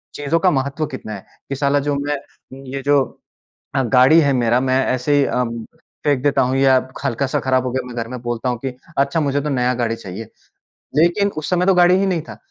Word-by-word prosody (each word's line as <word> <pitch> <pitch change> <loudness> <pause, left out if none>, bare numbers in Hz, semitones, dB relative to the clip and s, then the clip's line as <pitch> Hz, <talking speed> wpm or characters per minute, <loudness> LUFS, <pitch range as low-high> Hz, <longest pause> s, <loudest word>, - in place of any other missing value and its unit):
चीज़ों 145 +3 0
का 185 +2 +3
महत्व 140 +1 -1
कितना 110 - -7
है? 100 - -9 0.2
कि 135 - -2
साला 140 +1 +1
जो 145 - +1
मैं 145 0 -2 0.6
ये 135 - -3
जो 145 -1 +4 0.8
अ, 135 - +3
गाड़ी 130 +7 +5
है 140 -2 +2
मेरा 120 -1 +2
मैं 130 0 +1
ऐसे 130 +3 0
ही 140 - +4
अ, 125 -1 0 0.6
फेंक 140 -3 +1
देता 145 -2 +2
हूँ 130 +1 0
या 135 -1 +5 0.3
हल्का-सा 135 +1 -1
खराब 130 -1 +1
हो 125 - -1
गया 130 -1 -2
मैं 125 -1 -9
घर 115 -1 -3
में 125 -1 -6
बोलता 120 +1 -3
हूँ 120 -2 -1
कि, 130 -1 -5 0.2
"अच्छा 140 +4 +2
मुझे 145 -1 0
तो 150 - -3
नया 125 -2 +1
गाड़ी 115 -2 -1
चाहिए।" 105 0 -8 0.7
लेकिन 185 +5 +3
उस 155 - -3
समय 180 0 +1
तो 195 - +4
गाड़ी 180 +1 +5
ही 195 - +1
नहीं 175 -4 0
था। - - -9
135 Hz, 225 wpm, -19 LUFS, 125-145 Hz, 0.8 s, गाड़ी